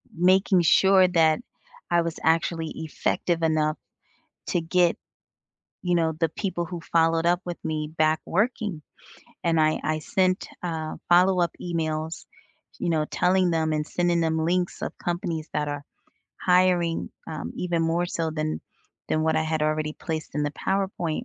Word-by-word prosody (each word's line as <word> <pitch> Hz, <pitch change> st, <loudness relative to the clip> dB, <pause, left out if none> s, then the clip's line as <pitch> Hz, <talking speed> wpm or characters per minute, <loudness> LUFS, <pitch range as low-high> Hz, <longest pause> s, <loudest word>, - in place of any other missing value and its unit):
Making 185 Hz, +1 st, +4 dB
sure 190 Hz, +3 st, +5 dB
that 160 Hz, -3 st, +3 dB, 0.5 s
I 175 Hz, 0 st, +4 dB
was 170 Hz, -1 st, -4 dB
actually 165 Hz, 0 st, +1 dB
effective 165 Hz, +1 st, -1 dB
enough 155 Hz, -1 st, +1 dB, 0.7 s
to 175 Hz, -, +1 dB
get, 170 Hz, +1 st, +2 dB, 0.9 s
you 180 Hz, -1 st, +1 dB
know, 165 Hz, -1 st, +2 dB
the 165 Hz, -1 st, +2 dB
people 175 Hz, +1 st, -3 dB
who 175 Hz, 0 st, -6 dB
followed 165 Hz, 0 st, +2 dB
up 175 Hz, +1 st, +3 dB
with 175 Hz, -1 st, -4 dB
me 155 Hz, -1 st, -2 dB
back 155 Hz, 0 st, +3 dB
working, 210 Hz, -3 st, -1 dB, 0.6 s
and 165 Hz, -2 st, +3 dB
I 155 Hz, 0 st, +3 dB
I 155 Hz, 0 st, 0 dB
sent, 185 Hz, +4 st, 0 dB, 0.2 s
uh, 160 Hz, -2 st, -3 dB
follow-up 175 Hz, -1 st, +4 dB
emails, 160 Hz, -2 st, -3 dB, 0.6 s
you -, -, -1 dB
know, 155 Hz, -2 st, +1 dB
telling 180 Hz, +1 st, +2 dB
them, 160 Hz, -1 st, +1 dB
and 150 Hz, -1 st, -1 dB
sending 175 Hz, 0 st, +1 dB
them 160 Hz, -1 st, +1 dB
links 180 Hz, +1 st, 0 dB
of -, -, -5 dB
companies 170 Hz, -2 st, -3 dB
that 150 Hz, -1 st, 0 dB
are 145 Hz, 0 st, -4 dB, 0.6 s
hiring, 180 Hz, -2 st, +2 dB, 0.2 s
um, 155 Hz, -2 st, -5 dB
even 175 Hz, -2 st, 0 dB
more 170 Hz, +2 st, +1 dB
so 165 Hz, -2 st, -2 dB
than 155 Hz, 0 st, -2 dB, 0.5 s
than 155 Hz, -, +1 dB
what 160 Hz, 0 st, +2 dB
I 160 Hz, -, +2 dB
had 155 Hz, -1 st, -1 dB
already 155 Hz, 0 st, 0 dB
placed 160 Hz, -3 st, -5 dB
in 150 Hz, -, +1 dB
the 145 Hz, -, -2 dB
PowerPoint, 190 Hz, -4 st, -2 dB
165 Hz, 155 wpm, -25 LUFS, 155-175 Hz, 0.9 s, sure